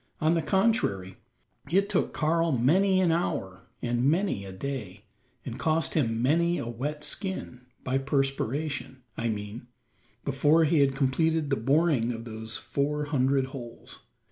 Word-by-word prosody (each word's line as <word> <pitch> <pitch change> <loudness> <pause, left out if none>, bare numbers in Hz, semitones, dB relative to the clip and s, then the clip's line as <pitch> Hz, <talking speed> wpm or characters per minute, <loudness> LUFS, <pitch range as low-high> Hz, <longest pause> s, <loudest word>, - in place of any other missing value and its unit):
On 155 +1 +3
the 165 - +2
contrary, 150 - +1 0.5
it 195 +5 +3
took 205 -3 0
Karl 165 +1 +1
many 185 +10 +3
an 175 -3 +3
hour 95 - -2 0.2
and 120 0 0
many 160 - +1
a 95 - -7
day, 105 -2 -6 0.4
and 125 0 -6
cost 160 0 +1
him 115 -6 +1
many 170 +5 +3
a - - -3
wet 145 +6 -4
skin 150 - -3 0.2
by 130 +1 0
perspiration, 135 0 -1
I 115 0 -1
mean 105 +2 -5 0.6
before 145 +4 +3
he 155 0 +3
had 135 -1 +3
completed 150 +3 +1
the - - +4
boring 135 0 +2
of 115 0 -7
those 110 0 -5
four 150 +1 -1
hundred 135 -2 +2
holes. 120 -4 -9
140 Hz, 145 wpm, -28 LUFS, 120-160 Hz, 0.6 s, the